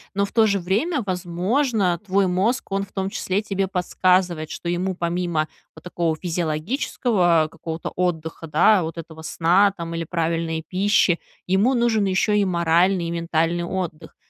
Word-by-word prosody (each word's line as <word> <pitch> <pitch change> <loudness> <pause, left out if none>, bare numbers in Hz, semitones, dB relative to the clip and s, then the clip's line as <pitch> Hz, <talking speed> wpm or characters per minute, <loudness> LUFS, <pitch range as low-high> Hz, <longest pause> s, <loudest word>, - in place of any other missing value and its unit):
Но 200 0 +2
в 200 - -10
то 225 -2 +4
же 200 -1 +1
время, 225 - 0
возможно, 185 - 0
твой 195 0 +2
мозг, 195 +9 0
он 195 0 0
в - - -27
том 190 -1 -2
числе, 200 -1 -1
тебе 195 -2 -2
подсказывает, 180 -3 +1
что 170 - -5
ему 180 +2 -1
помимо 170 -2 -1 0.3
вот 160 - -14
такого 170 -2 -1
физиологического 170 - 0
какого-то 165 0 -6
отдыха, 165 -2 -2
да- 175 +5 +4
вот 165 +1 -5
этого 160 -1 -9
сна, 180 +5 +3
там, 170 -2 -6
или 165 0 -3
правильной 165 -1 -2
пищи- 190 -2 +2 0.3
ему 195 +8 +2
нужен 235 -4 +2
еще 195 +2 +2
и 200 - +2
моральный, 175 +1 +2
и - - -3
ментальный 170 0 0
отдых. 175 -3 -5
180 Hz, 160 wpm, -22 LUFS, 165-195 Hz, 0.3 s, то